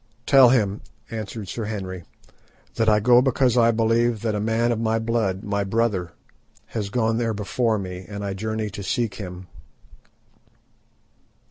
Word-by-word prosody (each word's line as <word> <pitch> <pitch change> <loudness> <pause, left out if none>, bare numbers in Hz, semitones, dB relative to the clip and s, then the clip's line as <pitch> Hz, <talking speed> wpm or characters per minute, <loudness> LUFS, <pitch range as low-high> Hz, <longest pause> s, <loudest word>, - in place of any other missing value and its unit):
"Tell 135 -3 +7
him," 105 -5 +1 0.3
answered 110 -2 -6
Sir 115 +2 -4
Henry, 95 -4 -5 0.7
"that 110 -1 +1
I 105 -1 +4
go 120 +3 +5
because 130 -2 +2
I 115 -2 +5
believe 115 0 +1
that 110 -2 0
a 105 - -1
man 115 +3 +1
of 115 - -1
my 115 0 +1
blood, 110 -4 -1
my 100 -1 -1
brother, 100 -4 0 0.6
has 105 -3 -3
gone 115 +1 0
there 115 -2 -1
before 105 +3 0
me, 90 -2 -6
and 100 -1 -5
I 100 - -2
journey 110 +1 -3
to 100 - -7
seek 110 +2 -1
him." 90 -1 -8
110 Hz, 155 wpm, -23 LUFS, 100-115 Hz, 0.7 s, Tell